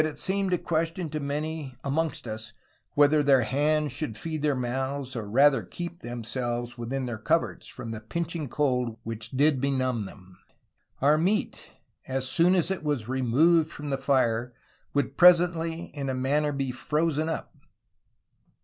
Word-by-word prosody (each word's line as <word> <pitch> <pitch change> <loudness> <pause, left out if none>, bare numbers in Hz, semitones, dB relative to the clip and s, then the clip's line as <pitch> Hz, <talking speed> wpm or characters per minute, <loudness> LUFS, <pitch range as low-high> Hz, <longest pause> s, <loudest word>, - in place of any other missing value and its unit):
DRAKE 155 -1 -2 0.2
AND 195 0 +1
NEW 180 - +2
ALBION 165 -3 -2
103 150 -2 -3
amongst 155 +2 -1
vs, 110 0 -6 0.4
whether 145 +1 +5
their 135 -3 +4
hands 150 +4 +1
should 130 -4 -4
feed 155 +5 -4
their 145 -2 +2
mouthes, 130 +2 -3
or 110 -3 -4
rather 135 +5 +5
keepe 175 0 -7
themselues 120 0 -4
within 125 +2 -3
their 120 -3 -4
couerts - - 0
from 120 -2 -7
the 110 - -5
pinching 165 +4 -3
cold 125 -4 0
which 115 0 -5
did 140 +1 +2
benumme 130 -6 0
them... 95 -1 -15 0.6
our 150 +2 +5
meate, 195 +6 -1 0.3
as 130 0 -2
soone 170 +7 +3
as 180 0 +2
it 190 - -3
was 145 -7 -1
remooued 145 +6 +3
from 145 -1 -6
the - - +2
fire, 125 -3 +1 0.4
would 140 - 0
presently 175 -2 +4
in 140 -2 -3
a 130 - -1
manner 145 +3 +1
be 135 -2 -2
frozen 155 +4 0
vp 165 - -2
140 Hz, 155 wpm, -27 LUFS, 125-155 Hz, 0.6 s, whether